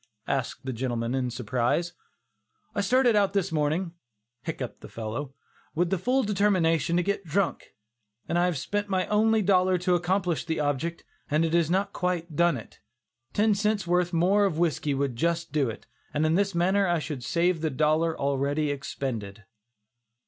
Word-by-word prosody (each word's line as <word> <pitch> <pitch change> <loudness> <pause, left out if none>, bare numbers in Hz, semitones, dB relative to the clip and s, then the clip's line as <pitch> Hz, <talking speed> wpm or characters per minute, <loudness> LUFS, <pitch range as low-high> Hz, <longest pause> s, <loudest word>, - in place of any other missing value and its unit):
asked 135 0 -2
the 130 - -2
gentleman 120 -1 -2
in 130 -2 0
surprise. 125 +8 -1 0.8
"I 205 - 0
started 245 +3 +3
out 200 -2 +3
this 195 -2 0
morning 160 +3 0 0.5
(hiccupped - - -5
the - - -10
fellow) 115 +5 -5 0.4
with 175 +2 +1
the 195 - +1
full 255 +7 +2
determination 185 -5 +2
to 175 - +2
get 200 +1 -1
drunk, 185 +3 -2 0.5
and 175 - +1
I 175 - +3
have 180 -4 0
spent 205 +8 -2
my 185 -1 +1
only 220 +1 +3
dollar 185 -1 +3
to 180 +1 +1
accomplish 175 -1 0
the 160 -2 -2
object, 150 +3 -1 0.3
and 155 +2 +2
it 160 - -2
has 170 -2 +3
not 190 +3 0
quite 175 -3 -2
done 170 -2 +3
it. 115 - -12 0.5
Ten 210 +1 +3
cents 205 -1 0
worth 175 0 +1
more 190 +4 +3
of 175 -6 -1
whiskey 155 -4 0
would 135 -2 -1
just 170 +2 0
do 140 -4 +1
it, 110 - -8 0.3
and 150 +1 +2
in 155 - +2
this 200 +1 +1
manner 190 +3 +2
I 175 -1 +2
should 150 -5 -5
save 170 +5 +1
the 160 - 0
dollar 155 +3 +1
already 140 +2 0
expended." 115 -7 -5
170 Hz, 175 wpm, -27 LUFS, 145-190 Hz, 0.8 s, started